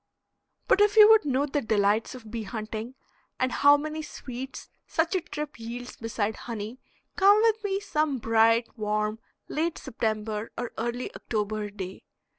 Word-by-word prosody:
But 410 - +4
if 415 +1 +4
you 425 -1 +11
would 440 -6 +6
know 275 0 +1
the 290 0 -1
delights 215 +1 +1
of 225 -4 -11
bee 230 -1 -3
hunting, 220 +3 -5 0.4
and 255 0 +1
how 285 +3 +6
many 310 +1 -4
sweets 260 -3 -7 0.2
such 330 +3 0
a 370 - +1
trip 300 -4 -6
yields 240 +2 -7
beside 220 -2 -2
honey, 230 +1 -6 0.4
come 405 +2 +6
with 445 -1 +2
me 390 -1 0
some 305 -8 0
bright, 230 0 +3
warm, 215 0 -1 0.3
late 325 +2 -1
September 215 -1 -3
or 245 0 -3
early 240 +2 -3
October 210 -1 -3
day. 190 -2 -7
240 Hz, 155 wpm, -27 LUFS, 220-300 Hz, 0.4 s, you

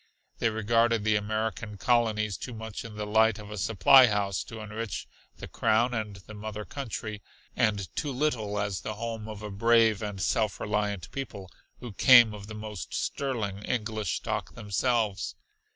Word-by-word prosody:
They 115 - +2
regarded 115 +1 +2
the 110 0 +3
American 110 0 -2
Colonies 110 -2 +1
too 125 - -7
much 110 -1 -6
in 115 -2 -9
the 105 0 -3
light 110 0 +3
of 105 -1 -10
a 105 - -6
supply 115 +6 +7
house 100 -3 0
to 115 - -9
enrich 110 +1 -5 0.3
the - - -8
Crown 120 +3 +2
and 110 -3 -3
the 100 +2 -12
Mother 105 0 -6
Country, 110 -6 -5 0.3
and 100 -3 +1
too 145 - -2
little 125 -7 -1
as 100 -2 -2
the 110 - -4
home 110 0 -5
of 105 -1 -8
a 105 - -5
brave 115 +1 +4
and 105 -2 -4
self 105 +2 0
reliant 105 -5 -2
people 100 -9 -6 0.3
who 120 -4 -7
came 120 0 +7
of 100 -1 -9
the 110 - -8
most 105 -4 -6
sterling 110 -8 -2
English 110 -2 -2
stock - - -4
themselves. 110 -1 0
110 Hz, 170 wpm, -28 LUFS, 105-115 Hz, 0.3 s, supply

